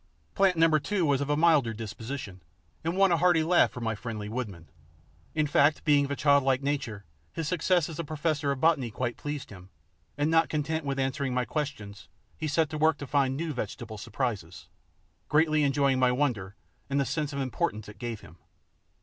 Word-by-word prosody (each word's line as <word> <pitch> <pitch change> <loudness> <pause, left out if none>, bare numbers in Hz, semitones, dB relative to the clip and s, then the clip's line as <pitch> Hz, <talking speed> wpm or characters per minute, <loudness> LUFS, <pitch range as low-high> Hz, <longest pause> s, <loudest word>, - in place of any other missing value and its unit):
Plant 190 -3 +3
Number 160 -1 +4
Two 190 +3 0
was 140 -2 +2
of 140 - -2
milder 155 -8 +4
disposition, 110 -2 -7 0.4
and 165 +3 -2
won 195 -1 +5
a 170 - +4
hearty 175 -2 +4
laugh 175 +2 +4
for 125 - -9
my 115 -1 -1
friendly 110 -1 -6
woodman. 105 -9 -5 0.7
In 155 -1 +2
fact, 145 +1 +3
being 145 -2 +4
of - - -7
a 145 - -1
childlike 140 -2 +3
nature, 135 -9 -3 0.3
his 165 -2 -3
success 175 0 +2
as 160 -2 -8
a - - -1
professor 150 -1 -1
of 140 - -3
botany 150 -5 +2
quite 120 +2 -3
pleased 145 -4 -6
him, 95 -2 -12 0.5
and 145 +2 +1
not 165 0 +4
content 155 +1 -2
with 140 -1 -2
answering 135 -1 -1
my 125 0 +1
questions, 110 -7 -5 0.3
he 155 - -4
set 155 +2 +2
to 155 - -4
work 155 0 +3
to 145 - -6
find 135 -1 +1
new 160 0 -3
vegetable 110 -4 -6
surprises, 105 - -4 0.6
greatly 155 0 +3
enjoying 140 -2 +2
my 125 -1 +4
wonder 120 -8 -1 0.3
and 140 +1 +1
the 140 - +1
sense 150 0 -2
of 140 - -5
importance 110 -5 -2
it 105 - -12
gave 115 -4 -5
him. 85 - -15
140 Hz, 190 wpm, -28 LUFS, 120-155 Hz, 0.7 s, won